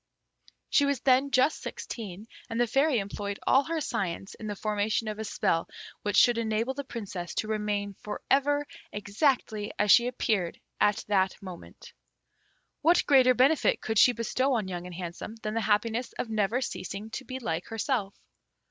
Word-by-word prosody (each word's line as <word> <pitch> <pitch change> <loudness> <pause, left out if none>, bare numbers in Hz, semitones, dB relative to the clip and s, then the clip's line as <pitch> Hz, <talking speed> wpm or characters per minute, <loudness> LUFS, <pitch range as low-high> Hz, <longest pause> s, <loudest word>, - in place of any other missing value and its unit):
She 285 - +5
was 280 -3 0
then 265 +1 +4
just 275 +3 +2
sixteen: 220 - -7 0.2
and 230 0 -3
the 240 - +4
Fairy 270 +4 +2
employed 200 0 -4
all 270 - +5
her 330 0 -1
science 195 - -3
in 215 - -8
the 205 - -3
formation 210 +2 -1
of 215 0 -4
a - - -2
spell 185 -6 0 0.3
which 205 0 0
should 240 -1 +6
enable 225 +3 0
the 280 +1 -5
Princess 200 -9 -6
to 215 - -1
remain 210 -2 -1
for 210 - -5
ever 290 +2 +3 0.3
exactly 210 0 0
as 210 -1 +3
she 240 - +7
appeared 215 -8 -1 0.2
at 205 0 +2
that 190 -2 +1
moment. 185 -3 -11 0.9
What 335 +3 +4
greater 255 -3 +6
benefit 275 +4 +3
could 220 -1 0
she 250 - +7
bestow 255 +3 0
on 215 -5 -1
Young 180 -1 -5
and 180 - -9
Handsome 175 +4 -6
than 215 - -2
the 230 - 0
happiness 220 +3 0
of 225 - -4
never 220 +3 +1
ceasing 210 -2 -5
to 265 - -5
be 260 0 -6
like 175 -9 -3
herself? 225 -3 -2
220 Hz, 175 wpm, -28 LUFS, 205-255 Hz, 0.9 s, she